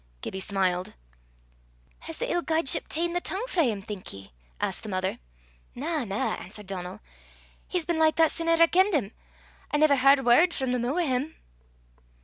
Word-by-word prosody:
Gibbie 190 Hz, -, -4 dB
smiled. 190 Hz, -2 st, -1 dB, 1.0 s
"Has 325 Hz, -1 st, -8 dB
the -, -, -2 dB
ill 350 Hz, -, +1 dB
guideship 320 Hz, -4 st, +2 dB
ta'en 340 Hz, +2 st, -1 dB
the 355 Hz, -, -1 dB
tongue 390 Hz, +7 st, -3 dB
frae 335 Hz, -, +2 dB
'im, 205 Hz, -3 st, -4 dB
think 205 Hz, -3 st, -7 dB
ye?" 95 Hz, -5 st, -11 dB, 0.3 s
asked -, -, -2 dB
the 215 Hz, -, -8 dB
mother. 185 Hz, -1 st, -2 dB, 0.6 s
"Na, 300 Hz, +2 st, -2 dB
na," 200 Hz, 0 st, -1 dB
answered 205 Hz, +3 st, -9 dB
Donal; 190 Hz, +1 st, -6 dB, 0.7 s
"he's 360 Hz, -3 st, -2 dB
been 340 Hz, -2 st, -1 dB
like 315 Hz, 0 st, +4 dB
that 325 Hz, -2 st, +4 dB
sin 330 Hz, -1 st, -3 dB
ever 330 Hz, 0 st, +5 dB
I -, -, +6 dB
kenned 375 Hz, +2 st, +3 dB
him. 220 Hz, -8 st, -1 dB, 0.6 s
I 295 Hz, -, 0 dB
never 295 Hz, -2 st, +4 dB
h'ard 270 Hz, 0 st, +5 dB
word 320 Hz, +9 st, +5 dB
frae 260 Hz, -2 st, -1 dB
the 250 Hz, -, 0 dB
moo' 245 Hz, +5 st, -1 dB
o' -, -, -2 dB
'im." 290 Hz, -1 st, -1 dB
275 Hz, 185 wpm, -27 LUFS, 205-330 Hz, 1.0 s, I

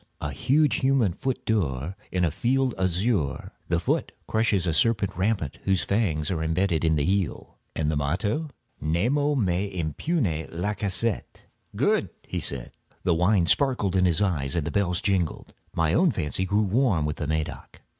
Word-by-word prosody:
"A 75 Hz, -, -3 dB
huge 140 Hz, -, +2 dB
human 130 Hz, -8 st, +2 dB
foot 130 Hz, +6 st, -3 dB
d'or, 85 Hz, -, -1 dB, 0.2 s
in 90 Hz, -1 st, +1 dB
a 80 Hz, -, 0 dB
field 130 Hz, -, +1 dB
azure; 95 Hz, -, 0 dB, 0.2 s
the 85 Hz, 0 st, +2 dB
foot 85 Hz, -, 0 dB, 0.2 s
crushes 110 Hz, -5 st, +1 dB
a 85 Hz, -, +1 dB
serpent 105 Hz, +3 st, +1 dB
rampant 95 Hz, -6 st, -1 dB
whose 95 Hz, -2 st, +2 dB
fangs 95 Hz, -7 st, 0 dB
are 85 Hz, -4 st, -1 dB
imbedded 80 Hz, +1 st, +1 dB
in 80 Hz, -1 st, +3 dB
the 75 Hz, -, +1 dB
heel." 95 Hz, -1 st, -1 dB, 0.2 s
"And 80 Hz, -1 st, 0 dB
the -, -, -1 dB
motto?" 100 Hz, -, -1 dB, 0.3 s
"Nemo 125 Hz, -, +1 dB
me 95 Hz, -6 st, +1 dB
impune 85 Hz, -, -1 dB
lacessit." 100 Hz, +4 st, -2 dB, 0.3 s
"Good!" -, -, +2 dB, 0.2 s
he -, -, -3 dB
said. 65 Hz, -3 st, -2 dB, 0.3 s
The 90 Hz, -, +3 dB
wine 90 Hz, +2 st, +3 dB
sparkled 120 Hz, -, +2 dB
in 90 Hz, -1 st, +4 dB
his 90 Hz, +2 st, +2 dB
eyes 75 Hz, -8 st, 0 dB
and 85 Hz, -4 st, 0 dB
the 80 Hz, -, -2 dB
bells 90 Hz, -3 st, 0 dB
jingled. 95 Hz, -5 st, -1 dB, 0.2 s
My 80 Hz, -1 st, +2 dB
own 175 Hz, -, +4 dB
fancy 95 Hz, -, -2 dB
grew 100 Hz, +3 st, +2 dB
warm 100 Hz, -, +2 dB
with 75 Hz, 0 st, -2 dB
the 75 Hz, -, -3 dB
Medoc. 80 Hz, -1 st, -4 dB
95 Hz, 165 wpm, -26 LUFS, 80-110 Hz, 0.3 s, in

